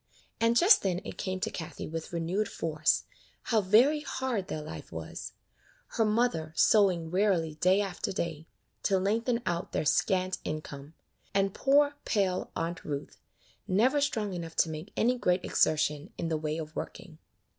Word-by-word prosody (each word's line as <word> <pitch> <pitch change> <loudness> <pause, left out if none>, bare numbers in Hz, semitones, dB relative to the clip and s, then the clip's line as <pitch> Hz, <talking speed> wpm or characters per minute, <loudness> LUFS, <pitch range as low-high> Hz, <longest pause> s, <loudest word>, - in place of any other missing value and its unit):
And 230 +1 +3
just 395 - +7
then 180 -3 0
it - - -8
came 185 -1 -2
to 220 - -1
Kathie 160 - -6
with 160 0 -6
renewed 175 +5 -1
force, 155 -2 0 0.4
how 225 -3 +2
very 235 +11 +5
hard 260 -8 -3
their 155 - -4
life 80 - -9
was; 80 -1 -7 0.6
her 225 - +1
mother 210 -8 0
sewing 180 -7 +3
wearily 180 -5 +2
day 185 +6 +3
after 195 -3 -3
day, 165 -4 -4 0.3
to 195 - +2
lengthen 230 +5 0
out 175 +3 -2
their - - 0
scant 185 +3 +1
income, 150 -1 -6 0.4
and 195 -1 +2
poor, 285 +1 +3
pale 190 -4 0
Aunt 170 +1 -3
Ruth, 140 -2 -5 0.5
never 250 +10 +3
strong 220 -9 -1
enough 165 -2 -6
to 165 - +3
make 155 +6 -7
any 245 +2 +2
great 180 -4 +1
exertion 155 +1 +1
in 165 - -2
the 160 - 0
way 155 0 -2
of 155 -1 -7
working. - - -7
185 Hz, 160 wpm, -29 LUFS, 160-220 Hz, 0.6 s, just